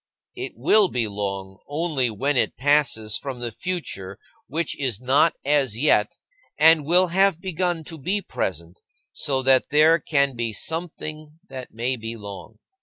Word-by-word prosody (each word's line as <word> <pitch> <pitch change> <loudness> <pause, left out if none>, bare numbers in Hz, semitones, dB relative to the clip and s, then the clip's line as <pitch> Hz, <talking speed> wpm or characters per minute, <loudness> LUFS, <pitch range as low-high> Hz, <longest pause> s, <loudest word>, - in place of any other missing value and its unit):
It - - -6
will 215 -2 +4
be 120 -8 -1
long 100 -2 -5
only 145 -4 -1
when 135 +7 -1
it 125 - +1
passes 135 -6 +2
from 135 -3 -6
the 120 -1 -3
future 105 - -5 0.3
which 165 +4 -2
is 130 -7 -1
not 135 +6 +3
as 140 -6 +1
yet, 115 -6 +2 0.4
and 160 -1 +6
will 180 +2 +4
have 190 -1 +2
begun 175 -2 -2
to 160 +1 -9
be 190 +9 0
present, 85 - -5 0.3
so 135 -3 -1
that 130 0 +3
there 155 +3 +5
can 140 -3 0
be 115 -2 -2
something 155 - -5
that 130 -2 -8
may 125 +3 -1
be 115 0 -6
long. 100 -2 -10
140 Hz, 155 wpm, -23 LUFS, 115-160 Hz, 0.4 s, and